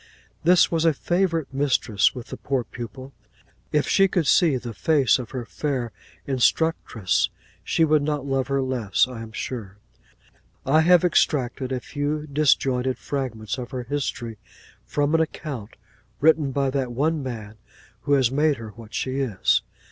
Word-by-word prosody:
This 175 +2 +5
was 165 -1 +1
a 165 -1 +4
favourite 170 -3 0
mistress 130 -7 +2
with 125 -1 -8
the - - -6
poor 135 -3 -1
pupil. 125 +4 -9 0.6
If 150 -1 +1
she 195 0 +4
could 180 -4 0
see 155 -2 +4
the 120 -2 -7
face 140 0 +3
of 125 - -6
her 125 -3 -5
fair 130 -4 -3 0.3
instructress, 130 - +1 0.3
she 165 - +2
would 155 -1 +3
not 145 -1 -2
love 135 -1 0
her 140 -1 0
less, 120 -6 +1
I 125 -3 -8
am 115 -1 -9
sure. 105 -3 -6 0.9
I 155 +4 +4
have 180 +1 +5
extracted 135 -6 +1
a 130 - -1
few 145 +3 -3
disjointed 135 -3 +1
fragments 125 -5 -4
of 125 -1 -6
her 130 -2 -4
history, 120 -4 -4 0.5
from 145 +1 0
an 165 - +4
account, 140 -8 -5 0.4
written 155 -1 +3
by 135 0 0
that 130 -2 -1
one 150 +5 0
man 110 -5 -7 0.4
who 145 - 0
has 130 -4 +3
made 150 +1 +2
her 115 -1 -8
what 115 0 -12
she 130 +1 -2
is. 120 -8 +2
135 Hz, 160 wpm, -24 LUFS, 120-150 Hz, 0.9 s, This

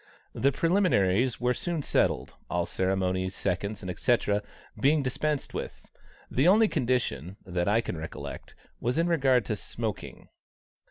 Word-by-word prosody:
The 140 - +2
preliminaries 130 - +2
were 125 0 +2
soon 170 +1 -2
settled, 65 - +1 0.2
all 85 0 0
ceremony, 95 0 0
seconds, 100 +2 -3 0.2
&c., 120 -1 +4 0.6
being 145 +5 +3
dispensed 145 +3 -1
with; - - -7 0.4
the 135 +6 +3
only 215 +4 +6
condition, 120 - -1
that 90 -2 -1
I 110 +3 +3
can 85 - -5
recollect, 80 +1 -7 0.2
was 120 +5 -1
in 165 - +3
regard 135 -8 +3
to 110 - -1
smoking. 100 - -5
120 Hz, 130 wpm, -28 LUFS, 95-145 Hz, 0.6 s, only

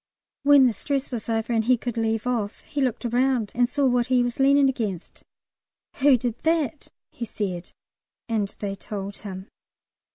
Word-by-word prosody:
When 285 -1 +6
the 245 - +3
stress 275 +6 -3
was 235 -2 -5
over 225 +1 0
and 225 -1 +1
he 250 +1 +4
could 240 0 -4
leave 225 -1 -1
off, 225 -4 -2
he 290 - -4
looked 250 -2 -1
round 245 -2 +1
and 245 0 +2
saw 285 +1 +1
what 245 -2 +2
he 250 -1 +3
was 245 +1 -3
leaning 275 +1 +5
against. 215 -9 -3 0.8
"Who 275 -1 +5
did 235 -1 -3
that?" 320 -2 0 0.2
he - - -7
said. 190 -5 -4 0.6
And 220 -4 0
they 200 -2 -3
told 200 0 -6
him. 190 -1 -8
240 Hz, 170 wpm, -25 LUFS, 215-265 Hz, 0.8 s, When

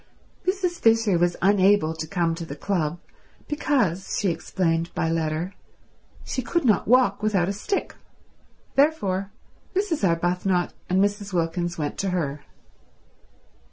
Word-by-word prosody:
Mrs. 370 -2 0
Fisher 225 -5 +3
was 175 0 +2
unable 195 -4 +4
to 160 0 -5
come 170 -1 0
to 165 +1 -5
the 140 -4 -7
club 170 -1 -1 0.5
because, 240 - 0
she 200 - +1
explained 165 0 -1
by 165 - 0
letter, 165 +3 -1 0.7
she 260 - -2
could 320 +6 -1
not 215 -4 +3
walk 240 -4 +4
without 200 -5 +2
a 200 - -1
stick; 210 - -2 0.8
therefore 200 -11 +2 0.5
Mrs. 370 - 0
Arbuthnot 175 +1 +1 0.2
and 185 +1 +2
Mrs. 205 -1 -2
Wilkins 175 0 -1
went 150 -2 -3
to 195 - 0
her. 150 -6 -2
190 Hz, 130 wpm, -24 LUFS, 170-215 Hz, 0.8 s, unable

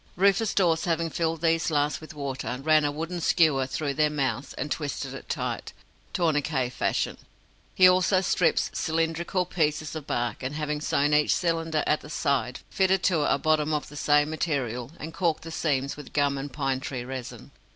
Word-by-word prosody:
Rufus 200 +3 +2
Dawes, 170 -4 +2
having 165 -1 0
filled 165 -1 -1
these 165 -1 +2
last 145 -1 0
with 155 -1 -11
water, 135 -4 -4
ran 155 0 +4
a 145 - +1
wooden 165 +4 -4
skewer 150 -6 +3
through 140 +1 -2
their 150 +2 +2
mouths, 135 -3 -2
and 145 - -4
twisted 145 -3 -3
it - - -10
tight, - - -3 0.4
tourniquet 150 -6 0
fashion. - - -1 0.6
He 185 - +8
also 185 +1 +4
stripped 180 -2 +1
cylindrical 165 +3 0
pieces 155 -3 -1
of 155 -3 -6
bark, 120 -2 -2
and 130 +3 -4
having 150 -1 -2
sewn 145 -1 +1
each 150 0 +4
cylinder 165 -3 0
at 150 - +1
the 150 - -11
side, 135 -5 -1
fitted 190 -1 +2
to 165 -6 +2
it - - +1
a - - +3
bottom 155 +1 +1
of 150 - -3
the 145 - -12
same 145 +1 +3
material, 130 -7 -2
and 160 +1 -7
caulked 165 -4 0
the 165 - -7
seams 140 -4 -1
with 145 -3 -11
gum 145 -1 +2
and 140 +1 -5
pine 135 -2 -1
tree 130 -3 -5
resin. 130 -1 -7
150 Hz, 185 wpm, -26 LUFS, 140-165 Hz, 0.6 s, He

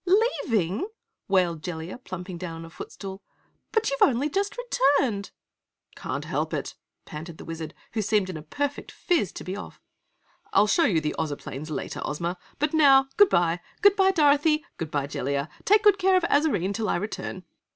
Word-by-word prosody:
"Leaving!" 295 - +1 0.4
wailed 180 -5 +2
Jellia, 165 +4 -6
plumping 185 -6 -7
down 170 -2 -5
on - - -8
a 165 - -12
foot - - -9
stool. 195 0 -8 0.5
"But 445 -6 +1
you've 275 - -3
only 275 +3 +3
just 395 +3 -1
returned!" 275 - +1 0.7
"Can't - - -4
help - - -2
it," - - -4 0.3
panted 160 +2 -8
the - - -10
Wizard, 165 -1 -6 0.2
who 220 - 0
seemed 205 -1 +1
in 185 - -5
a 155 - -6
perfect 285 - -3
phiz 320 - 0
to - - -7
be 185 - -4
off, 205 - -9 0.7
"I'll - - +6
show 320 +11 +3
you 165 -7 +2
the 150 0 -2
Ozoplanes 150 -1 -4
later, 155 - -4
Ozma, 170 +4 -3 0.2
but 300 +2 0
now 270 -3 +6
Goodbye! 175 - +4 0.2
Goodbye, 395 -1 +6
Dorothy! 305 -2 +3
Goodbye 150 -3 -2
Jellia! 140 +1 -2 0.2
Take 420 +1 +5
good 410 -2 +5
care 380 0 +4
of 365 - 0
Azarine 285 - +2
till 220 0 -2
I - - +2
return!" 190 -1 -4
205 Hz, 170 wpm, -26 LUFS, -, 0.7 s, I'll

